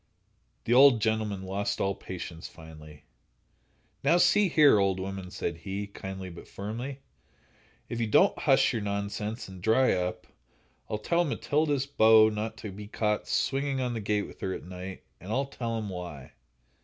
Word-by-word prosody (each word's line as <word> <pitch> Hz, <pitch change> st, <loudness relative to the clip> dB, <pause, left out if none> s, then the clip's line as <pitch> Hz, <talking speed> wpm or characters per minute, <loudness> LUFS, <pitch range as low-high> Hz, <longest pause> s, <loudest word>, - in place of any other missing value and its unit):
The 120 Hz, -, +1 dB
old 130 Hz, -2 st, +7 dB
gentleman 110 Hz, -3 st, -1 dB
lost 100 Hz, +2 st, -2 dB
all 100 Hz, 0 st, +1 dB
patience, 90 Hz, -3 st, -7 dB
finally. 75 Hz, -2 st, -13 dB, 1.0 s
"Now, 155 Hz, +5 st, +4 dB
see 200 Hz, +2 st, +4 dB
here, 150 Hz, -9 st, +6 dB
old 95 Hz, -1 st, +1 dB
woman," 95 Hz, -1 st, -5 dB
said 85 Hz, -2 st, -4 dB
he, 100 Hz, +4 st, -4 dB
kindly, 95 Hz, -2 st, -7 dB
but 85 Hz, -, -11 dB
firmly; 120 Hz, +7 st, -6 dB, 0.9 s
"if 120 Hz, -, -4 dB
you 115 Hz, -, 0 dB
don't 105 Hz, -, +4 dB
hush -, -, +3 dB
your 115 Hz, -, -1 dB
nonsense 105 Hz, +2 st, -3 dB
and 95 Hz, -2 st, -11 dB
dry 115 Hz, +6 st, +3 dB
up, 90 Hz, 0 st, -2 dB, 0.6 s
I'll 105 Hz, -, -1 dB
tell 170 Hz, +11 st, +1 dB
Matilda's 145 Hz, -2 st, 0 dB
beaux 110 Hz, -5 st, +6 dB
not 110 Hz, +1 st, -4 dB
to 105 Hz, -1 st, -7 dB
be 105 Hz, +2 st, -9 dB
caught 105 Hz, -1 st, -1 dB
swinging 135 Hz, 0 st, 0 dB
on 125 Hz, -2 st, -1 dB
the 115 Hz, -, -3 dB
gate 105 Hz, 0 st, 0 dB
with -, -, -13 dB
her 95 Hz, -, -2 dB
at -, -, -8 dB
night, 90 Hz, +1 st, -8 dB, 0.2 s
and 95 Hz, +5 st, -8 dB
I'll 135 Hz, +4 st, +1 dB
tell 115 Hz, -4 st, -4 dB
'em 110 Hz, -2 st, -4 dB
why." 90 Hz, -8 st, -8 dB
105 Hz, 170 wpm, -28 LUFS, 95-120 Hz, 1.0 s, old